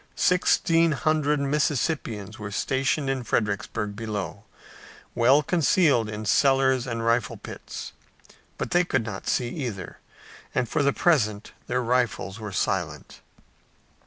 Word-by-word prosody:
Sixteen 165 -2 +3
hundred 150 +1 +1
Mississippians 140 - -1
were 105 -1 -5
stationed 135 +7 0
in 135 -2 -1
Fredericksburg 105 -2 -1
below, 105 -3 -5 0.7
well 130 +5 +4
concealed 150 - +3
in 105 0 -5
cellars 130 - +3
and 115 -2 -3
rifle 115 -1 +1
pits, - - -8 0.6
but - - -4
they 175 0 +4
could 130 -9 -1
not 105 -3 -6
see 120 -2 0
either, 120 - -5 0.6
and 125 - +1
for 155 - 0
the 140 0 +3
present 110 -12 +1 0.2
their 125 0 0
rifles 115 -4 0
were 105 -2 -6
silent. - - -2
125 Hz, 125 wpm, -25 LUFS, 105-145 Hz, 0.7 s, well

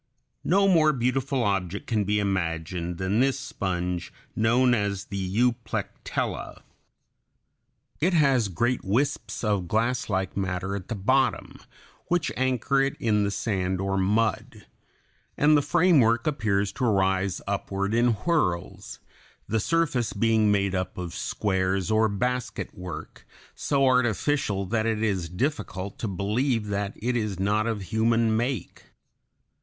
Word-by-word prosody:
] - - -50
No 195 +3 +3
more 160 -5 +4
beautiful 130 +1 0
object 100 -2 -1
can 110 -3 0
be 105 +1 +1
imagined 85 -3 -2
than 95 +4 0
this 135 +1 +2
sponge, 90 -9 -3 0.2
known 120 +3 +3
as 100 -3 -1
the 100 - -5 0.2
Euplectella. 120 -1 -2 1.4
It 175 +5 +2
has 135 -8 +3
great 120 +7 -1
wisps 120 +9 -1
of 100 -5 0
glasslike 110 -4 -1
matter 95 0 -2
at 100 - -6
the 115 - -3
bottom, 130 +6 0 0.5
which 175 -2 0
anchor 130 +1 +1
it 135 0 0
in 105 -2 +2
the 100 - 0
sand 95 -3 -1
or 95 0 -1
mud, 105 +2 0 0.7
and 150 +1 +5
the 145 - +4
framework 145 -7 +3
appears 105 -9 0
to 130 - -2
rise 95 -3 +1
upward 100 0 -2
in 120 +1 +3
whirls, 105 - -2 0.5
the 110 - 0
surface 150 -3 0
being 110 0 +3
made 100 -1 +1
up 95 -1 -3
of 90 -2 -5
squares 95 -1 -1
or 110 0 +3
basket 125 +4 -2
work, 90 -3 -9 0.3
so 140 -1 +1
artificial 125 -3 +1
that 110 +3 0
it 110 -1 0
is 95 -6 -1
difficult 100 - -3
to 115 - -2
believe 105 +4 -1
that 100 0 -2
it 120 +2 -2
is 105 -5 -2
not 105 +3 +1
of 110 -4 -2
human 110 +3 +2
make. 120 -2 -3
110 Hz, 135 wpm, -26 LUFS, 95-125 Hz, 1.4 s, and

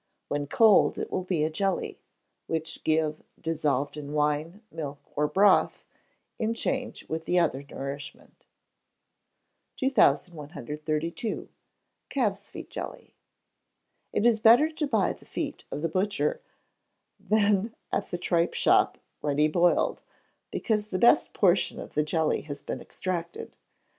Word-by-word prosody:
When 145 0 -2
cold, 215 +5 +5
it - - -4
will 185 - -1
be 175 -5 0
a 155 - 0
jelly, 195 +3 -2 0.5
which 160 0 -3
give, 155 -1 +1 0.2
dissolved 150 -4 -1
in 150 -1 -6
wine, 150 +6 0
milk, 145 -3 -5 0.2
or 150 0 +2
broth, 200 +6 +3 0.6
in 225 +1 0
change 260 +1 -3
with 160 0 -4
the 180 - +1
other 155 -6 +2
nourishment. 140 0 -8 1.3
2132. 155 - 0 0.6
Calves' 205 -7 -1
Feet - - -9
Jelly. - - -7 1.0
It 215 - 0
is 235 -2 +4
better 240 +9 +6
to 310 -1 -2
buy 220 -8 +2
the - - -18
feet - - -5
of 150 - -5
the - - +2
butcher, 205 - 0 0.8
than 205 +1 +2 0.2
at - - -1
the 175 - -3
tripe 170 -1 +1
shop - - +3 0.2
ready 150 +1 +2
boiled, 175 +3 +2 0.5
because 215 -2 -1
the 185 - -2
best 235 +5 +5
portion 190 -2 +2
of - - -9
the 150 - +2
jelly 155 +1 0
has 145 -1 -8
been - - -5
extracted. 170 -2 -5
170 Hz, 130 wpm, -27 LUFS, 150-205 Hz, 1.3 s, better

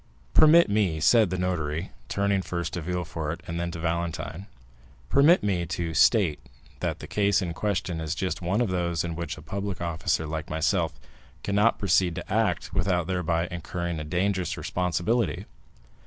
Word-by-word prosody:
"Permit 160 +2 +7
me," 100 -6 +1
said 110 +5 +5
the 90 - -2
notary, 85 -2 -2 0.2
turning 100 -1 +1
first 85 -2 -4
to 85 - -3
Villefort 85 -1 -4
and 85 0 -4
then 85 0 -2
to 85 - -6
Valentine—"permit 80 - 0
me 95 -4 +1
to 85 0 -3
state 90 -5 +4 0.4
that - - -2
the - - -9
case 100 0 +2
in 90 -4 -3
question 90 -3 -2
is 80 -2 -2
just 95 -1 -2
one 95 +6 0
of 120 - +1
those 85 -3 0
in 85 -1 -4
which 85 +1 -4
a 75 - -11
public 100 +3 -4
officer 85 -1 -1
like 80 0 -4
myself 80 0 0 0.4
cannot 105 +3 +2
proceed 90 -3 +2
to 90 +2 -5
act 110 0 0
without 90 -3 +1
thereby 85 -1 0
incurring 85 -1 -4
a - - -4
dangerous 90 +3 -1
responsibility. 90 +6 -1
85 Hz, 160 wpm, -26 LUFS, 80-100 Hz, 0.4 s, Permit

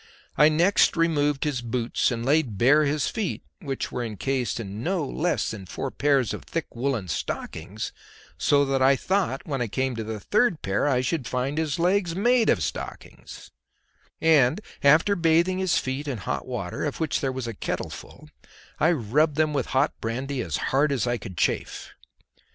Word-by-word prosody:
I 150 +2 +6
next 170 +4 +3
removed 150 -4 +1
his 145 -5 -1
boots 120 0 0
and 115 -1 -3
laid 140 -7 +2
bare 145 +8 +5
his 145 +1 0
feet 215 -5 -3 0.2
(which 140 -8 -4
were 125 - -3
encased 120 +4 -2
in 105 -1 -6
no 175 +1 -1
less 165 +5 -1
than 100 -4 -8
four 135 +7 -4
pairs 140 -5 +1
of - - -5
thick 165 -6 -5
woollen 120 -5 -1
stockings, 90 +4 -4 0.4
so 145 0 +3
that 135 -1 0
I 135 +1 +5
thought 185 -2 -1
when 135 -4 -3
I 120 - 0
came 130 +3 -1
to 110 - -3
the 110 0 -5
third 210 - +1
pair 95 +7 0
I 130 -3 +2
should 130 -1 -2
find 130 +5 -1
his 155 -3 -1
legs 175 0 +1
made 240 +4 +3
of - - +2
stockings), - - -7 0.7
and 155 -1 +4 0.2
after 155 +8 +5
bathing 170 +2 +2
his 185 -2 +2
feet 135 +3 -3
in 135 -4 -2
hot 100 - -4
water, - - -4
of - - -3
which 160 -2 0
there 135 - 0
was 130 -1 -4
a 115 - -4
kettleful, - - -6 0.5
I 160 +3 +4
rubbed 145 +4 +1
them 155 0 +1
with 135 -5 -1
hot 135 +3 +1
brandy 130 +4 -3
as 80 -9 -2 0.2
hard 145 +2 +3
as 135 -3 0
I 120 0 0
could 95 -6 -9
chafe. - - -1
140 Hz, 180 wpm, -25 LUFS, 120-160 Hz, 0.7 s, I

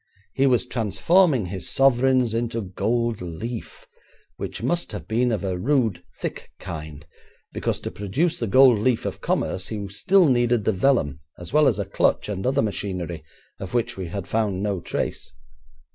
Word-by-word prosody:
He 135 +1 +3
was 125 -1 +3
transforming 125 - +2
his 95 0 -4
sovereigns 130 -2 +3
into 115 0 -1
gold 115 +3 -1
leaf, 115 - -6 0.5
which - - -5
must 175 0 -1
have - - -6
been 120 +2 +1
of 105 -3 -1
a 95 -2 -2
rude, 115 -3 +1 0.2
thick - - -5
kind, 75 -2 -8 0.5
because - - -2
to - - -5
produce 140 - -1
the 115 - -1
gold 130 0 +6
leaf 120 +2 +1
of - - -4
commerce 95 0 -1
he 105 -2 -4
still 180 - +3
needed 120 -3 +2
the - - +3
vellum 95 - +1 0.2
as 90 +7 -9
well 150 -1 +5
as 115 -7 +2
a 100 - -2
'clutch' 100 - +1
and 100 +2 -2
other 135 +2 +2
machinery, 90 -6 -3 0.4
of 95 +4 -6
which 120 0 0
we 95 -2 -5
had 90 +2 -5
found 105 -4 0
no 100 -3 -1
trace. - - -4
110 Hz, 170 wpm, -24 LUFS, 95-125 Hz, 0.5 s, gold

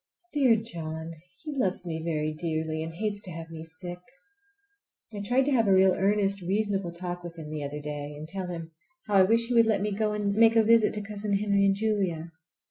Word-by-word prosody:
Dear 265 -6 +5
John! 165 -7 -5 0.3
He 305 -2 -5
loves 190 -8 -1
me 160 -2 -4
very 155 -2 -1
dearly, 160 0 -2
and 160 +1 -4
hates 205 +4 -3
to 185 - -3
have 165 0 -8
me 160 -1 -7
sick. 175 +2 -6 1.1
I 205 - -5
tried 245 +6 +2
to 290 - +1
have 230 -5 +3
a - - +4
real 190 0 +6
earnest 200 +1 +1
reasonable 195 0 -1
talk 175 0 -6
with 170 -1 -8
him 155 -2 -8
the 155 -1 -4
other 145 +1 -5
day, 145 0 -5
and 155 +1 -8
tell 185 +2 -4
him 165 -2 -6 0.3
how 210 - -4
I - - +8
wish 230 +5 +3
he - - 0
would 230 -1 +5
let 210 -3 +2
me 210 - -1
go 210 +1 0
and 205 -1 0
make 225 +2 +5
a 225 - +6
visit 225 -1 +4
to 210 - -3
Cousin 205 0 -4
Henry 200 0 +2
and 195 0 +3
Julia. 195 -6 -1
195 Hz, 220 wpm, -28 LUFS, 165-210 Hz, 1.1 s, I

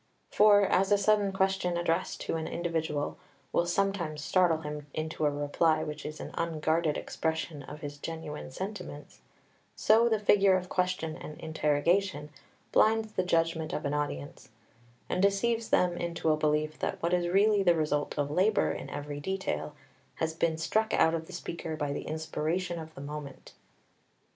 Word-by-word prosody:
For 205 -1 +6
as 195 +1 +2
a 205 - +6
sudden 205 0 +3
question 190 -2 +1
addressed 170 +1 -1
to - - -2
an 160 -1 -3
individual 160 -4 -2 0.3
will 170 - +2
sometimes 175 -5 -1
startle 175 -3 +3
him 150 -1 -6
into 155 -1 -1
a - - +4
reply 145 +2 +1
which 150 0 -5
is 155 0 -7
an - - -6
unguarded 160 -1 0
expression 160 -2 -3
of 150 +2 -10
his 145 -1 -7
genuine 160 -3 -6
sentiments, 180 -1 -7 0.6
so 230 +2 +4
the 220 - +3
figure 200 -2 +4
of 180 0 -6
question 180 -4 -1
and 150 -2 -9
interrogation 155 +1 0 0.4
blinds 220 0 +3
the 200 - 0
judgment 165 -2 0
of 150 - -3
an 140 - 0
audience, 145 - -4 0.6
and - - -1
deceives 225 +4 +1
them 180 -1 +3
into 170 -2 -1
a - - +4
belief 155 0 0
that - - -2
what 170 +1 +1
is 175 -1 +2
really 200 +3 +4
the 175 -3 +4
result 150 -2 -1
of 145 0 0
labour 195 +7 +3
in - - -6
every 145 0 -5
detail 190 -3 -3 0.4
has 160 0 -1
been 160 0 0
struck 220 +7 +1
out 160 - +4
of 165 -1 -3
the - - -11
speaker 165 -1 -5
by 145 -2 -2
the - - -5
inspiration 160 +3 -2
of 160 0 -9
the - - -8
moment. 145 -1 -8
165 Hz, 170 wpm, -30 LUFS, 150-190 Hz, 0.6 s, For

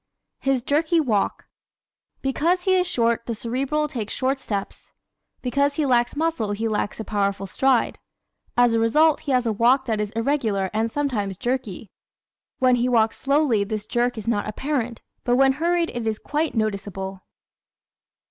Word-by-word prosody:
His 270 -3 0
Jerky 315 +5 +2
Walk 225 -10 0
¶ - - -40 0.8
Because 330 +7 +1
he 375 - +3
is 365 -1 +3
short 235 -6 0
the 230 - -2
Cerebral 270 +7 -1
takes 230 -8 -4
short 265 +1 0
steps. 200 -6 -5 0.5
Because 280 +3 +1
he 305 - 0
lacks 245 -1 +2
muscle 295 -10 -1
he 225 +2 -2
lacks 210 0 -2
a - - -3
powerful 200 -2 -1
stride. 260 +4 +1 0.6
As 245 -1 +5
a 230 - +2
result 300 +8 +4
he 285 - -4
has 250 -2 +2
a 225 - +1
walk 250 +5 +3
that 220 -3 -1
is 210 - -2
irregular 225 -6 0
and 225 +1 0
sometimes 220 -10 -2
jerky. 240 -5 -3 0.7
When 255 -2 +4
he 245 +1 +1
walks 225 -2 +2
slowly 275 -7 +2
this 210 0 -4
jerk 240 +2 0
is 220 - -6
not 210 -3 0
apparent, 245 0 -3 0.2
but 245 - +2
when 270 +1 +5
hurried 340 0 +1
it 240 -2 -4
is 220 -1 0
quite 300 +4 -2
noticeable. 195 -3 -3
240 Hz, 165 wpm, -23 LUFS, 215-280 Hz, 0.8 s, As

